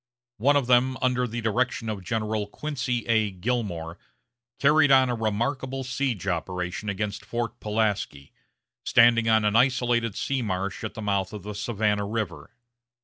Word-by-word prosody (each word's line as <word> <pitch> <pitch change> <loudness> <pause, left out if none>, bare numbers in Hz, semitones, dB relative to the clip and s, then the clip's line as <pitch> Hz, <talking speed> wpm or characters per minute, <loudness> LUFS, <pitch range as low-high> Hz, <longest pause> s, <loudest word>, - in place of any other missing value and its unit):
One 140 +7 +3
of 140 -3 +2
them, 125 +1 +3
under 125 -1 +1
the 120 +1 -4
direction 115 +1 0
of 105 -3 -4
General 110 +1 -2
Quincy 125 -2 -3
A. 110 -3 +2
Gillmore, 90 -5 -3 0.6
carried 150 +1 +4
on 130 -1 +6
a - - -1
remarkable 130 +5 -2
siege 125 -6 -2
operation 90 +2 -3
against 100 +1 -3
Fort 120 +2 -4
Pulaski, 105 -10 -2 0.5
standing 115 -1 +5
on 110 -1 +4
an 105 +1 +1
isolated 120 -3 +2
sea 135 -2 -1
marsh 95 -3 -3
at - - -5
the 110 - -6
mouth 100 -1 -1
of 105 -3 -7
the 105 +1 -6
Savannah 105 -1 -1
River. 100 -9 -4
110 Hz, 150 wpm, -26 LUFS, 100-125 Hz, 0.6 s, on